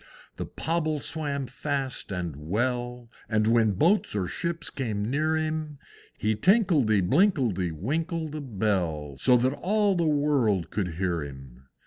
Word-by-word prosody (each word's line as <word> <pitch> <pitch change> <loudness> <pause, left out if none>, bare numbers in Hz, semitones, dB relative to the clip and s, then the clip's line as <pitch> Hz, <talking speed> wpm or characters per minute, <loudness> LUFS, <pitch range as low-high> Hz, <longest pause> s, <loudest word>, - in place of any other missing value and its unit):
The - - -4
Pobble 155 -2 -1
swam 145 -2 -2
fast 135 -3 -3
and 90 -5 -3
well, 120 - -2 0.2
And 110 -1 +2
when 110 -2 +3
boats 170 - +2
or 95 -3 0
ships 170 - -4
came 110 -6 -2
near 155 +6 +1
him, 155 -1 -2 0.4
He 110 +1 0
tinkledy 145 - +3
binkledy 130 - +2
winkled 160 - -2
a 155 - -4
bell 95 - -1
So 125 - +5
that 130 +3 +1
all 205 +5 +1
the 170 -3 +1
world 140 - +1
could 90 -5 -2
hear 85 -3 -1
him. 65 -2 -11
125 Hz, 140 wpm, -27 LUFS, 95-155 Hz, 0.4 s, So